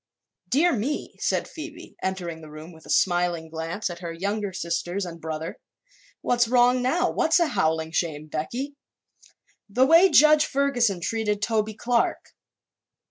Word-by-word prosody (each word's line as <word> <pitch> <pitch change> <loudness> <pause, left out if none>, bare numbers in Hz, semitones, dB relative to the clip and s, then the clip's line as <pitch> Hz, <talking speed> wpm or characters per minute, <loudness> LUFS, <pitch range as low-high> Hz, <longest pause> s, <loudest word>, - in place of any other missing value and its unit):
"Dear 330 +7 +3
me," 255 +6 -3
said - - 0
Phoebe, 315 -1 -10
entering 175 -4 -4
the 155 - -11
room 155 +3 -10
with 160 -1 -16
a - - -14
smiling 175 -3 +1
glance 165 +5 -3
at 175 -2 -6
her 170 -2 -5
younger 200 +4 -3
sisters 175 +2 -3
and 170 -2 -9
brother, 160 0 -5 0.6
"what's 240 -1 +2
wrong 245 +1 +4
now? 285 +8 +1
What's 320 +2 +2
a 340 - +4
howling 160 - 0
shame, 155 -3 -2
Becky?" 235 - -4 1.0
"The 250 +6 +3
way 335 +6 +6
Judge 305 0 +6
Ferguson 245 -9 +1
treated 210 +1 -1
Toby 215 0 -1
Clark." 235 +1 -1
205 Hz, 145 wpm, -25 LUFS, 170-255 Hz, 1.0 s, way